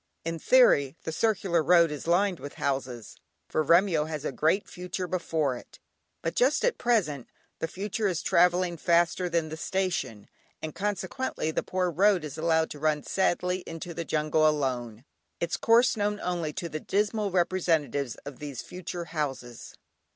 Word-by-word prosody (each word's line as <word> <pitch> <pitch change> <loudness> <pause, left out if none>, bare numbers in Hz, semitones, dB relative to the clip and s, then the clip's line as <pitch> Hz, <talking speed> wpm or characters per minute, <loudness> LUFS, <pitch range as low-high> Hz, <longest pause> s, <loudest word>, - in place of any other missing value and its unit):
In 165 0 -3
theory, 165 - +4
the 160 - -3
circular 185 -2 +1
road 170 0 +5
is 150 +1 -6
lined 180 +1 +2
with 145 - -8
houses, 130 -4 -3 0.3
for - - 0
Remyo 170 -1 +4
has 155 -2 -5
a - - -1
great 165 +6 +1
future 180 +1 -5
before 160 -6 -1
it; - - -12 0.5
but 165 - -1
just 265 - +2
at - - 0
present, 175 - +1 0.3
the 165 - -1
future 205 +4 -2
is 175 -4 -2
travelling 175 0 +3
faster 170 +2 +2
than 165 -2 0
the 160 - -6
station, 180 - -2 0.3
and 155 -1 -6
consequently 200 - -2
the - - -1
poor 185 -1 -1
road 190 0 +3
is 150 -2 -6
allowed 160 0 +1
to 145 - -7
run 155 -1 +1
sadly 180 -1 0
into 165 +1 -6
the 170 - -4
jungle 155 0 +2
alone, 125 -5 -2 0.3
its 170 0 -1
course 235 +2 +4
known 210 -1 -1
only 175 -4 -2
to 180 +1 -5
the 155 -1 -5
dismal 210 +3 0
representatives 165 -7 0
of 145 -2 -8
these 145 -4 -6
future 180 -1 -6
houses. 140 -7 -5
170 Hz, 165 wpm, -28 LUFS, 150-185 Hz, 0.5 s, road